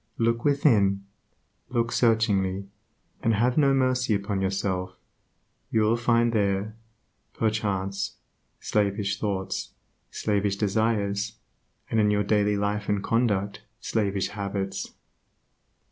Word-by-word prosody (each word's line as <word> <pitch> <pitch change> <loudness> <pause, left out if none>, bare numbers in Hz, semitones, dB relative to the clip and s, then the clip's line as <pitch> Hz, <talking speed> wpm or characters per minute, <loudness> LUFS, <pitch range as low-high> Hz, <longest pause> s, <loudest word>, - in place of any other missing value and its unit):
Look 115 0 +1
within; 105 -9 +3 0.6
look 115 -1 0
searchingly, 100 -5 +2 0.6
and 115 -1 +2
have 120 +4 +2
no 140 -3 +4
mercy 130 -4 +2
upon 100 -1 -2
yourself. 95 -1 -1 0.7
You 110 - +2
will 110 +2 +3
find 120 0 +2
there, 100 0 0 0.6
perchance, 100 -3 -1 0.4
slavish 100 -1 0
thoughts, 95 -3 -3 0.3
slavish 100 -2 0
desires, 105 0 0 0.6
and 115 - +2
in 105 -1 +4
your 105 0 +2
daily 105 0 +2
life 105 0 -1
and 100 -1 0
conduct 105 -4 0 0.2
slavish 100 -3 -1
habits. 100 -1 -4
105 Hz, 105 wpm, -26 LUFS, 100-115 Hz, 0.7 s, no